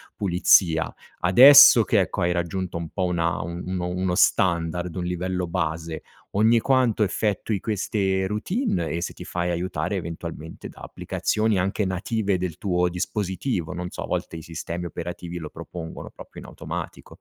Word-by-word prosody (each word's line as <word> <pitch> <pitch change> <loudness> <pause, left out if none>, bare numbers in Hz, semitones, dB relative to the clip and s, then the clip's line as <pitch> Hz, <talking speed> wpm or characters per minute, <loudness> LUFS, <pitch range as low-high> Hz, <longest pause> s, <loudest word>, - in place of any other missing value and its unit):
pulizia. 90 -3 +3 0.3
Adesso 135 +6 +9
che 105 -4 +3
ecco 90 +1 -3
hai 85 0 +2
raggiunto 85 0 -3
un 85 -1 -5
po' 95 -2 -2
una 85 -1 0
un 90 +2 -5
uno 90 +1 -2
standard, 85 -2 +1
un 90 -1 -3
livello 90 0 -2
base, 80 -2 -3 0.3
ogni 110 +3 +4
quanto 125 -3 +2
effettui 105 0 -1
queste 95 -2 -1
routine 105 - -1
e 85 - -2
se - - -4
ti - - -10
fai 90 0 -3
aiutare 90 +1 -2
eventualmente 85 -2 -7
da - - -15
applicazioni 110 -2 -1
anche 95 +3 0
native 95 +2 -1
del 90 -2 -4
tuo 90 -2 +1
dispositivo, 90 +1 -3
non 90 0 -5
so - - -6
a - - -4
volte - - -3
i 80 - -7
sistemi 85 +1 -6
operativi 85 0 -6
lo 80 -3 -6
propongono 85 0 -8
proprio - - -12
in - - -11
automatico. - - -7
90 Hz, 155 wpm, -24 LUFS, 85-100 Hz, 0.3 s, Adesso